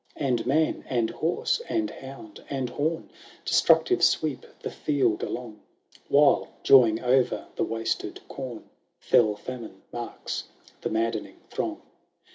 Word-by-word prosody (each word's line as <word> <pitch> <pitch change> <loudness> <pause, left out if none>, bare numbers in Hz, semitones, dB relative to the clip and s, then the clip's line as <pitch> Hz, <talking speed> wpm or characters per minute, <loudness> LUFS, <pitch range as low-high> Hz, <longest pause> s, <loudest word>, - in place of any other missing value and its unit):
XXI - - -10
And 120 -2 +1
man, 155 +4 +2
and 120 -3 +1
horse, 170 - 0
and 325 -2 0
hound, 130 -5 -10
and 130 -3 -2
horn, 160 +5 -2 0.3
Destructive 370 -1 +4
sweep 145 -5 +2
the - - -4
field 130 -7 +1
along; 115 -4 -5 0.5
"While, 145 0 +5 0.2
joying 120 -5 +7
o'er 125 +1 +2
the - - 0
wasted 115 0 -2
corn, 130 -4 -7 0.3
Fell 110 -3 +3
Famine 115 -3 -8
marks 120 -1 -5 0.4
the - - -2
maddening 110 0 -1
throng. - - -3
125 Hz, 125 wpm, -27 LUFS, 115-145 Hz, 0.5 s, joying